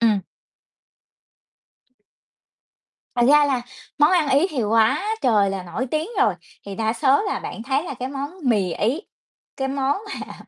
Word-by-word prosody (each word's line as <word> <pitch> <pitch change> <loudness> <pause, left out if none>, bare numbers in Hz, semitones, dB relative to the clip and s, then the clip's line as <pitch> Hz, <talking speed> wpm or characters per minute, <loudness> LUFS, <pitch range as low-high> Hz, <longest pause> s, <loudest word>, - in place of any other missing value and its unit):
Ừm. 220 -4 +3 2.9
Thật 240 - +2
ra 295 0 +6
là 260 -4 0 0.4
món 295 +3 +5
ăn 335 -6 +3
Ý 285 +7 +4
thì 260 -6 -1
quá 220 - +2 0.2
trời 210 -5 +3
là 195 -1 -4
nổi 180 +9 -4
tiếng 310 +5 -1
rồi, 205 - +3 0.3
thì 200 - -6
đa 220 +1 0
số 275 - +3
là 410 - -2
bạn 225 - -7
thấy 270 +3 0
là 280 - -5
cái 255 +1 -5
món 280 +1 -4
mì 200 -8 +2
Ý, 250 +10 0 0.6
cái 270 0 -2
món 275 +1 0 0.2
mà - - -8
260 Hz, 160 wpm, -22 LUFS, 220-285 Hz, 2.9 s, ra